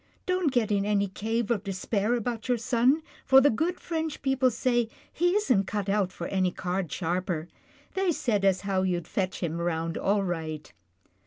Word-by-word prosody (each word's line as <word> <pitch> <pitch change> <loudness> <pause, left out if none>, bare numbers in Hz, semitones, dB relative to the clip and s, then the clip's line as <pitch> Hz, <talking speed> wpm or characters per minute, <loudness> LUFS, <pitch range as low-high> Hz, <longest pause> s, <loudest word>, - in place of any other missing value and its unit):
Don't 365 -6 +1
get 240 -5 +1
in 200 -1 +2
any 200 -1 +1
cave 225 +4 -2
of 210 -4 0
despair 200 +4 0
about 235 -1 -3
your 245 -1 +2
son, 250 +6 +2 0.2
for 265 0 +7
the 285 +2 +5
good 325 +10 -1
French 320 -3 -3
people 265 -1 +3
say 240 -1 +1 0.2
he 350 +3 +2
isn't 255 - +2
cut 205 -1 -2
out 195 -2 +1
for 170 - -6
any 185 0 +1
card 180 -1 -3
sharper. 175 -2 -2 0.5
They 385 -2 +1
said 225 -10 0
as 195 -1 +3
how 195 -2 0
you'd 175 -3 -1
fetch 185 -2 -2
him 165 -1 -1
round 165 -1 -1
all 200 +1 +2
right." 160 -4 -4
205 Hz, 180 wpm, -28 LUFS, 185-255 Hz, 0.5 s, for